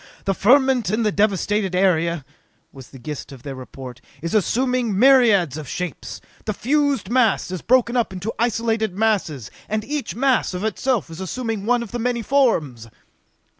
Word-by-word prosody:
"The 195 - +1
ferment 255 +1 +3
in 215 +3 0
the 210 - +2
devasted 205 -1 0
area," 170 -5 +1 0.5
was 135 -2 -13
the 135 - -13
gist 145 +4 -7
of 130 -3 -12
their 140 - -6
report, 130 -1 -10 0.2
"is 170 - -3
assuming 240 +1 +1
myriads 220 - +5
of 155 -3 -7
shapes! 180 -5 -5 0.3
The 215 - -2
fused 280 -4 0
mass 240 -7 +2
has 185 -1 -5
broken 245 0 +2
up 235 -5 +1
into 190 +4 -5
isolated 225 -4 0
masses, 190 - -1 0.2
and 215 0 -2
each 290 - -4
mass 255 -6 +1
of 180 - -4
itself 220 -3 -1
is 165 +3 -8
assuming 220 +1 -4
one 245 0 +2
of 225 - -10
the 240 - -4
many 240 0 -1
forms!" 160 - +1
215 Hz, 170 wpm, -21 LUFS, 170-245 Hz, 0.5 s, myriads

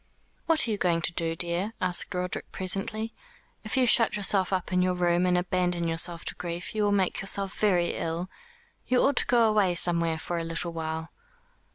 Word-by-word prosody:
"What 320 -5 +4
are - - -1
you 205 - -2
going 170 -2 +1
to - - +4
do, 165 -2 -1
dear?" 175 +6 -1
asked 180 +1 +2
Roderick 180 0 -4
presently. 215 +4 -3 0.5
"If 215 +4 -4
you 260 - +4
shut 230 -2 +4
yourself 195 -2 +2
up 185 -1 -2
in 180 - +2
your 180 0 +1
room 175 0 +1
and 180 0 +2
abandon 180 -1 -1
yourself 165 +1 +1
to - - -3
grief, 175 0 -6
you 215 - -2
will 205 -1 +2
make 195 -3 0
yourself 195 -1 +1
very 180 -5 +2
ill. 165 +2 -3 0.6
You 250 - +2
ought 280 -1 +1
to - - 0
go 235 -2 +4
away 205 -5 +2
somewhere 170 -2 +2
for 170 +1 -4
a - - -3
little 165 +1 -4
while." 160 0 -5
180 Hz, 200 wpm, -27 LUFS, 170-205 Hz, 0.6 s, What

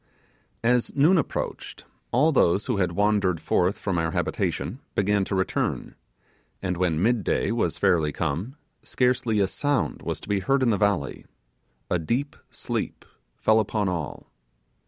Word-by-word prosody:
As 120 +1 +2
noon 165 +6 +5
approached, 145 - -4 0.3
all 150 +7 +4
those 100 - +3
who 120 -5 -1
had 90 -3 0
wandered 100 -3 +2
forth 90 +5 +1
from 95 -4 -1
our 80 0 0
habitation, 115 +10 -2 0.2
began 100 0 +2
to 95 - -2
return; 95 0 -1 0.7
and 90 -2 -2
when 85 -2 0
midday 115 -4 +1
was - - 0
fairly 80 -4 +2
come 85 - -3 0.3
scarcely 125 -4 +1
a 100 - +4
sound 145 +6 -1
was - - -3
to - - -11
be 100 -1 +1
heard 130 +8 +1
in 120 - +3
the - - +3
valley: 100 -9 0 0.6
a 90 - 0
deep 125 - -2
sleep - - -4 0.3
fell 110 0 +3
upon 105 -1 0
all. 85 -5 -5
100 Hz, 150 wpm, -25 LUFS, 90-125 Hz, 0.7 s, noon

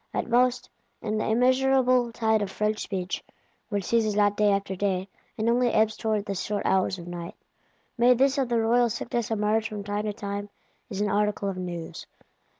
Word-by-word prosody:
At - - -1
most, 250 +1 +2 0.4
in 215 0 -1
the - - -1
immeasurable 255 +1 +3
tide 220 -2 +1
of 205 - -2
French 210 +2 -1
Speech 185 -2 -4 0.5
(which 205 -2 -1
ceases 220 0 +1
not 205 -1 +3
day 210 0 +3
after 200 -1 -1
day, 190 -1 -1 0.3
and 220 0 -1
only 240 +1 +3
ebbs 220 -1 +2
towards 215 -2 -1
the 200 - -3
short 205 +2 -3
hours 190 0 +2
of 170 - -9
night), 175 -1 -7 0.6
may 245 +1 +6
this 270 +3 +2
of 260 -3 0
the 235 -1 +2
royal 235 +2 +3
sickness 235 0 -3
emerge 220 0 +1
from 210 -2 -6
time 205 +1 -3
to 210 - -2
time 205 0 -5 0.4
as 200 0 -4
an 205 - +1
article 205 -1 0
of 190 - -5
news. 175 -2 -6
215 Hz, 190 wpm, -26 LUFS, 200-235 Hz, 0.6 s, may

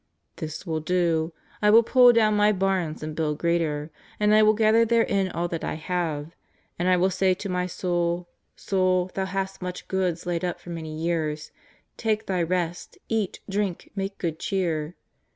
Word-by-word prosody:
This 155 +3 -6
will 160 -3 -1
I - - -11
do. 170 -2 +1 0.3
I 210 - +4
will 225 +2 +7
pull 245 +1 +7
down 220 -2 +3
my 210 0 +4
harns 190 -6 -1
and 155 0 -5
build 150 -2 -1
greater, 160 -2 0 0.3
and 210 0 +3
I 215 - +6
will 215 0 +5
gather 220 +1 +4
therein 220 -4 +2
all 175 0 -2
that 165 -1 -4
I - - -2
have. 160 -2 -3 0.5
And 175 - 0
I 185 0 +4
will 185 +2 +2
say 185 0 +2
to 200 - -6
my 180 0 -1
soul: 175 -1 -1 0.3
Soul, 185 -1 +1
thou 190 - -1
hast 195 0 -3
much 180 0 -6
goods 185 -3 -1
laid 175 -1 -2
up 175 -1 -2
for 175 - -10
many 160 -2 -6
years; 155 -2 -2 0.5
take 220 -1 0
thy 185 -2 0
rest, 175 0 -2
eat, 220 -4 -1
drink, 195 -3 -2
make 195 0 -3
good 165 -2 -3
cheer." 170 -4 -1
180 Hz, 185 wpm, -25 LUFS, 165-195 Hz, 0.5 s, will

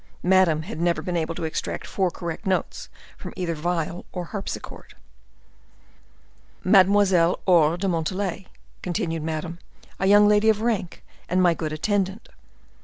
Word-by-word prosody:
Madame 180 -4 +3
had 165 -2 -6
never 170 0 +1
been 180 - -3
able 165 0 -1
to - - -5
extract 160 - -3
four 190 -2 0
correct 170 +1 -6
notes 190 - -2 0.3
from - - -8
either 175 -2 -2
viol 170 +1 -2
or 180 -2 -5
harpsichord. 200 +3 -7 1.7
"Mademoiselle 190 -2 +4
Aure 170 -2 +4
de 195 +2 -2
Montalais," 185 +2 -2 0.3
continued 165 -2 -2
Madame; 160 +2 -4 0.4
"a 190 - +1
young 205 +1 +7
lady 210 +1 +4
of 215 -1 +3
rank, 220 -7 -2 0.3
and 180 - +1
my 180 -2 +4
good 160 -2 -4
attendant." 195 +5 -2
180 Hz, 140 wpm, -24 LUFS, 165-195 Hz, 1.7 s, young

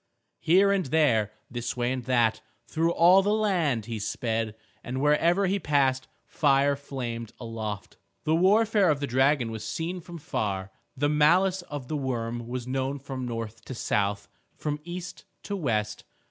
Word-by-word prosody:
Here 195 +4 +4
and 195 -5 +1
there, 125 -8 +2 0.2
this 120 0 -4
way 120 0 0
and 130 -1 -3
that, 120 -4 +2 0.2
through 165 +6 0
all 180 +3 +6
the 205 +2 +1
land 170 - +1
he 115 -1 -4
sped, 110 +1 -2 0.3
and 130 +2 -4
wherever 165 +7 +3
he 195 +2 +1
passed 135 -5 +1 0.2
fire 140 -1 +2
flamed 120 -5 -6
aloft. 110 -4 -6 0.3
The 155 - +1
warfare 205 +3 +4
of 145 -2 +2
the 140 - -1
dragon 130 -1 +2
was 110 -1 -6
seen 175 +2 -3
from 170 +1 -9
far. 95 - -3 0.3
The 145 +2 +2
malice 175 +6 +3
of 145 -7 -7
the 155 - -2
worm 120 -3 -3
was 125 0 -4
known 135 +2 -2
from 130 -2 -6
north 115 -1 -5
to 130 - -6
south, 100 -2 -1 0.3
from 150 -1 -3
east 175 +1 -7 0.2
to 205 - -3
west. 110 - -1
135 Hz, 160 wpm, -27 LUFS, 115-165 Hz, 0.3 s, all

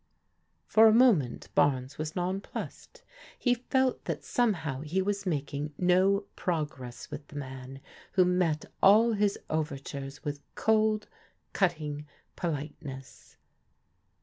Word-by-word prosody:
For 220 0 +6
a - - +7
moment 220 - +3
Barnes 135 -1 +1
was 155 0 -4
nonplussed. 190 - -5 0.3
He 245 - +2
felt 255 +1 0
that - - -3
somehow 160 - 0
he 155 +5 -1
was 200 +1 -1
making 145 -2 -2
no 185 +2 +4
progress 150 -8 -4
with 145 - -7
the - - -14
man 135 -1 -7 0.3
who 185 -1 +5
met 180 -4 +1 0.2
all 220 +4 +7
his 205 -1 +1
overtures 140 -2 -4
with 145 -1 -3
cold, 215 -1 +2 0.5
cutting 150 -5 -1 0.3
politeness. 145 -4 -6
160 Hz, 115 wpm, -29 LUFS, 145-200 Hz, 0.5 s, a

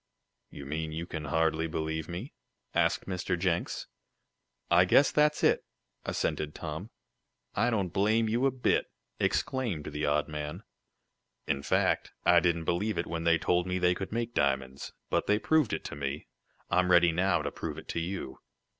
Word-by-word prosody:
"You 70 - -9
mean 80 +3 -3
you 80 +2 -4
can 80 -3 -5
hardly 80 +2 +1
believe 80 0 -3
me?" 90 - -6 0.4
asked - - +2
Mr. 90 -1 -2
Jenks. 85 -1 -1 0.9
"I 85 +1 +7
guess 130 +9 +5
that's 150 0 +2
it," - - +4 0.4
assented 75 0 -2
Tom. 80 +6 -5 0.6
"I 120 - +2
don't 100 -7 -1
blame 110 +3 +2
you 120 +5 +2
a - - +4
bit!" 130 -1 +1 0.3
exclaimed 115 - 0
the 75 0 -2
odd 75 0 +1
man. 75 -1 -5 0.8
"In 70 - -1
fact, - - +1
I 90 -1 +7
didn't 85 -1 +1
believe 100 +4 0
it 85 - 0
when 85 0 -4
they 85 0 +5
told 90 +2 +1
me 90 0 0
they 90 0 +3
could 95 +1 -5
make 115 +1 -2
diamonds. 65 - -1 0.2
But - - +1
they 105 - +4
proved 150 +1 +2
it - - -2
to - - -6
me. 70 +1 -4 0.5
I'm 90 +1 +3
ready 85 -1 +6
now 90 -1 +1
to 70 - -2
prove - - -5
it - - -9
to - - -1
you." 85 -6 -4
85 Hz, 170 wpm, -30 LUFS, 80-100 Hz, 0.9 s, I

